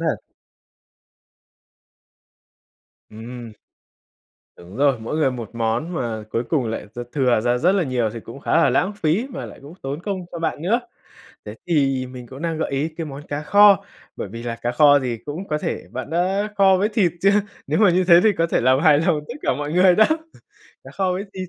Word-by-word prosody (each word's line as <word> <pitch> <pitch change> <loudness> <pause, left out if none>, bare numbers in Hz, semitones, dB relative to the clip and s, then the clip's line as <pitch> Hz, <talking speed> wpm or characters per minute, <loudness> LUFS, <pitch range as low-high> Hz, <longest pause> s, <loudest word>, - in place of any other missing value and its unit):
thật. 160 -2 0 2.9
Ừm. 115 +1 -9 1.1
Đúng 90 +4 -12
rồi, 140 -2 +2
mỗi 115 +7 -4
người 150 -4 +2
một 120 -4 -7
món 115 +9 -2
mà 115 -7 -3
cuối 115 +2 -1
cùng 145 -6 +1
lại 110 -1 -4
d - - -10
thừa 125 -6 +2
ra 120 +2 +1
rất 175 +8 +3
là 195 -2 +2
nhiều 125 -5 -1
thì 115 - -8
cũng 115 +5 -11
khá - - +1
là 165 - +4
lãng 190 +3 +1
phí 190 +5 0
mà 270 +2 -6
lại - - -12
cũng 145 +5 -12
tốn 140 +3 -4
công 190 -3 -4
cho 170 - -5
bạn 160 -2 -3
nữa. 220 +8 +1 0.6
Thế 105 - -8
thì 135 -6 +1
mình 125 -1 -10
cũng 135 +6 -10
đang 165 -2 -2
gợi - - -2
ý 140 +3 -1
cái 165 +1 -6
món 145 0 -9
cá 145 +1 -4
kho, 200 +4 +5 0.3
bởi - - -5
vì 115 +4 -8
là 115 -1 -4
cá 120 - -1
kho 145 -1 +6
thì 125 -4 -3
cũng 165 +7 -6
có 150 - -1
thể - - -3
bạn 130 +3 -6
đã 190 +5 0
kho 195 -1 +5
với 205 +3 +1
thịt 205 -6 +1
chưa? 195 - +4 0.4
Nếu - - 0
mà 210 -4 +5
như 180 +2 +2
thế 175 -1 +6
thì 220 - +5
có 165 - +3
thể - - 0
làm 130 +2 +3
hài 155 -3 +5
lòng 165 -1 +1
tất - - -6
cả - - +1
mọi 145 +1 -4
người 180 +1 +5
đó, 215 - +6 0.8
cá - - -11
kho 190 -2 -1
với 185 +2 -3
thịt. 185 -1 -5
150 Hz, 215 wpm, -21 LUFS, 125-180 Hz, 2.9 s, kho